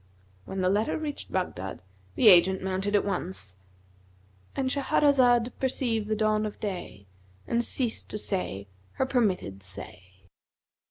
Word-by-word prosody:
When 190 - -4
the 185 - +2
letter 210 +3 +1
reached 305 -2 -6
Baghdad, 95 - -3 0.4
the 230 - +4
agent 190 +1 +6
mounted 190 +2 -1
at 205 - +3
once,—And 95 - -7
Shahrazad 255 -4 +3
perceived 240 -5 0
the 215 - 0
dawn 215 0 +1
of 210 - -9
day 180 - -5 0.4
and 235 0 +1
ceased 240 -2 -1
to - - -3
say 180 - -3 0.3
her - - 0
permitted 195 - 0
say. 95 0 -9
195 Hz, 125 wpm, -28 LUFS, -, 0.4 s, agent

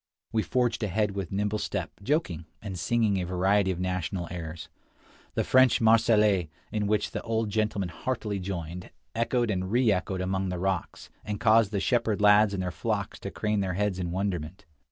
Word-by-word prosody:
We 110 - +1
forged 120 0 0
ahead 105 0 0
with 100 -3 -5
nimble 105 +2 -1
step, - - -3
joking, 100 - -1
and 100 -3 -6
singing 105 +1 +1
a - - -2
variety 95 +2 +2
of 90 -2 -2
national 90 -1 -2
airs. 85 -2 -6 0.7
The - - +1
French 130 0 +5
"Marseillaise," 110 -5 +4 0.2
in 105 -1 -1
which 105 0 0
the - - -4
old 115 -2 -1
gentleman 105 -3 0
heartily 105 0 -3
joined, 90 -2 -5 0.2
echoed 115 0 +1
and 95 -2 -1
reechoed 100 -6 +2
among 95 +1 -1
the 90 - -3
rocks, 95 -1 -3
and 105 -1 -4
caused 110 -2 +4
the 100 - 0
shepherd 115 -2 +1
lads 105 0 +6
and 95 -2 -2
their 90 - -2
flocks 85 - -3
to - - -5
crane 105 -1 -1
their 95 -2 -1
heads 100 -1 0
in 90 -2 -2
wonderment. 90 -1 -3
100 Hz, 175 wpm, -28 LUFS, 90-110 Hz, 0.7 s, lads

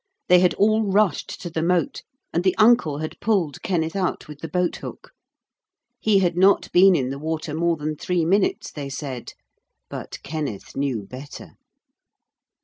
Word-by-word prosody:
They 180 0 +7
had 180 0 +3
all 215 +2 +3
rushed 200 -3 +1
to 175 - -5
the 160 - -2
moat, 180 - 0 0.3
and 170 - +1
the 185 -1 +2
uncle 215 -10 +4
had 155 +1 -6
pulled 190 -10 0
Kenneth 165 -2 -1
out 190 -2 -2
with 150 -1 -10
the 165 - -6
boat 180 0 -1
hook. - - -9 0.9
He 215 -2 +3
had 175 -3 +2
not 190 +3 +3
been 185 +1 +6
in 130 -4 -1
the 140 - -5
water 155 0 -3
more 170 +1 +1
than 150 +1 -3
three 175 +2 -1
minutes, 195 +4 +1
they 140 -2 -6
said. 135 -3 -6 0.6
But - - -6
Kenneth 145 -9 -5
knew 135 -6 -1
better. 130 +7 -10
170 Hz, 165 wpm, -23 LUFS, 150-190 Hz, 0.9 s, They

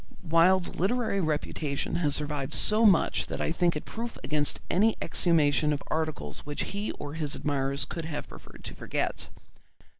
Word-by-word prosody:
Wilde's 175 +2 +4
literary 200 0 +1
reputation 150 -1 -1
has 150 -4 +1
survived 150 -1 -2
so 215 +1 +4
much 190 -5 +3
that - - -4
I - - 0
think 170 0 +2
it 150 - -4
proof 230 +1 -5
against 145 +3 0
any 215 +5 +3
exhumation 150 -3 +2
of 145 -1 -2
articles 155 - -2
which 145 0 -3
he 205 +2 -3
or 145 - -7
his 155 -2 -2
admirers 140 -1 -1
would 165 -2 -3
have 160 -2 -4
preferred - - -13
to - - -6
forget. - - -3
160 Hz, 160 wpm, -28 LUFS, 145-185 Hz, -, Wilde's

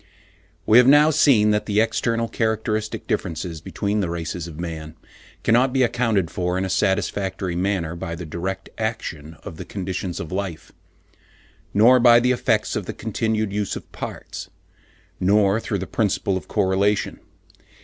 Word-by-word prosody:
We 110 +3 +7
have 125 - +5
now 145 +3 +7
seen 125 -9 +4
that 105 0 0
the 105 0 +2
external 115 +1 +1
characteristic 110 -1 -2
differences 80 0 -3
between 105 +4 -2
the 95 -4 -1
races 85 0 -4
of 80 -1 -10
man 80 -2 -6 0.5
cannot 125 +3 +3
be 130 -1 +3
accounted 115 -8 +1
for 90 0 -1
in 95 - 0
a 95 - -3
satisfactory 95 -2 -1
manner 90 -3 -1
by 85 0 -5
the 85 - -7
direct 85 +5 -5
action 80 -8 -4
of 80 - -8
the - - -6
conditions 95 -2 -4
of 80 - -6
life, 95 -4 -4 1.0
nor 120 +5 +6
by 120 -1 +7
the 125 +1 +2
effects 115 -3 +1
of 100 - -3
the - - -4
continued 110 -1 -2
use 105 -2 -1
of - - -9
parts, - - -7 0.7
nor 100 +2 +3
through 110 -2 -3
the 95 - -4
principle 100 -2 0
of 95 - -5
correlation. 100 0 +1
100 Hz, 160 wpm, -22 LUFS, 90-110 Hz, 1.0 s, We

